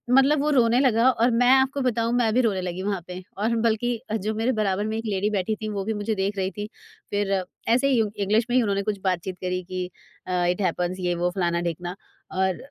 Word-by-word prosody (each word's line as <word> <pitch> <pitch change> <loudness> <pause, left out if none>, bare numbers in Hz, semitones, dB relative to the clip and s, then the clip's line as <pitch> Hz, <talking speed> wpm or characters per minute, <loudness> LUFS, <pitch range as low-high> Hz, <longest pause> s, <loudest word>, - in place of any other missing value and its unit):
मतलब 275 +3 +5
वो 300 - +1
रोने 240 -3 +4
लगा 250 -2 +4
और 240 0 +2
मैं 245 +2 +3
आपको 270 +1 +2
बताऊँ 235 -2 0
मैं 235 -3 +2
भी 250 - +4
रोने 205 -6 +1
लगी 180 0 -4
वहाँ 200 -2 -1
पे 180 0 -7 0.2
और 225 +3 0
बल्कि 230 +1 0 0.2
जो 215 +1 -1
मेरे 225 +4 +1
बराबर 200 0 0
में 220 - -2
एक 225 - -5
लेडी 205 0 0
बैठी 210 +1 -1
थी 215 - -3
वो 200 -2 -3
भी 220 - -1
मुझे 210 +1 -2
देख 195 +1 -1
रही 190 0 -1
थी। 205 0 -3 0.4
फिर 200 -2 0 0.3
ऐसे 250 +4 +4
ही 255 -4 +3
उ 215 - 0
इंग्लिश 210 +3 +2
में 245 - +1
ही - - +5
उन्होंने 200 -2 0
कुछ 205 0 -2
बातचीत 185 -1 -1
करी 185 0 -2
कि 180 0 -4 0.4
अ, 180 -1 +1
इट 180 +3 0
हैपन्स 180 0 -1
ये 180 -1 0
वो 175 +1 0
फलाना-ढिकना 175 -1 -1 0.4
और 190 -1 0
205 Hz, 230 wpm, -25 LUFS, 185-230 Hz, 0.4 s, मतलब